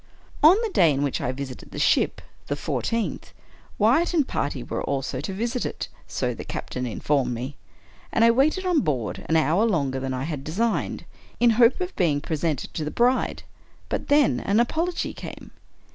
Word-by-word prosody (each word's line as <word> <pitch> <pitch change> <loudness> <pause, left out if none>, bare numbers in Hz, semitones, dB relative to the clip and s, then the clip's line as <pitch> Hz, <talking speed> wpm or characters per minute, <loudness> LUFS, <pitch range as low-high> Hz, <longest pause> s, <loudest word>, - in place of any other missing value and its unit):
On 340 +7 +7
the 455 - 0
day 165 -4 +5
in 140 0 0
which 140 - -1
I 125 - -1
visited 130 -1 -7
the - - -9
ship - - +2 0.2
(the 145 - -1
fourteenth), 150 - -2 0.4
Wyatt 265 - +3
and 300 -5 +3
party 140 -3 -2
were - - -4
also 135 -1 -2
to 160 - -4
visit 235 +5 -2
it - - -4
— - - -29
so - - 0
the - - -7
captain 125 0 -4
in 115 - -5
formed 135 -4 +1
me, 130 +5 -5 0.3
— - - -27
and 225 - +4
I 230 - +7
waited 305 +10 +2
on 355 -4 +3
board 130 - -2
an 160 - +3
hour 160 +5 +3
longer 140 -12 +1
than 130 0 -3
I 130 - -3
had 150 -2 -4
designed, 215 +10 -1 0.3
in 240 -1 +5
hope 235 - +4
of 365 +1 -4
being 155 -6 +2
presented 155 -1 -2
to 155 - -3
the 150 - -2
bride; 245 +8 +1 0.5
but - - -3
then 290 -2 +4
an 200 +3 +1
apology 330 +9 0
came. - - -9
165 Hz, 195 wpm, -25 LUFS, -, 0.5 s, On